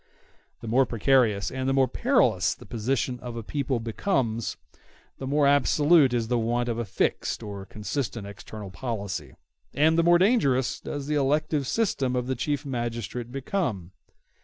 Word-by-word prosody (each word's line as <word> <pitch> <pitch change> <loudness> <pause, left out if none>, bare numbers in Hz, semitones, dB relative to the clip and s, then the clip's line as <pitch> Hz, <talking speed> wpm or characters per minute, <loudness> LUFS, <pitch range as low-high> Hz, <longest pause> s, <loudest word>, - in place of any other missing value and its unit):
The - - -7
more 125 +3 +3
precarious 115 -4 +2
and 130 0 -2
the - - +2
more 135 -1 +4
perilous 125 - +2
the - - -14
position 125 +2 -2
of 120 -1 -7
a 115 - -5
people 135 0 -2
becomes, 115 - -1 0.6
the 135 - -5
more 145 +1 +2
absolute 145 +1 +4
is 120 -2 0
the 120 0 +1
want 120 +2 0
of 115 0 -2
a 120 - -2
fixed 100 - -1
and 100 -2 -7
consistent 115 0 -4
external 100 0 -9
policy, 100 - -5 0.4
and 160 +3 +4
the - - +4
more 175 +1 +6
dangerous 170 - +2
does 145 -1 -5
the 150 - -2
elective 145 0 +1
system 135 - 0
of 125 -1 -1
the 130 - -1
Chief 145 +3 -2
Magistrate 120 -2 -4
become. 130 - -2
125 Hz, 160 wpm, -26 LUFS, 115-140 Hz, 0.6 s, more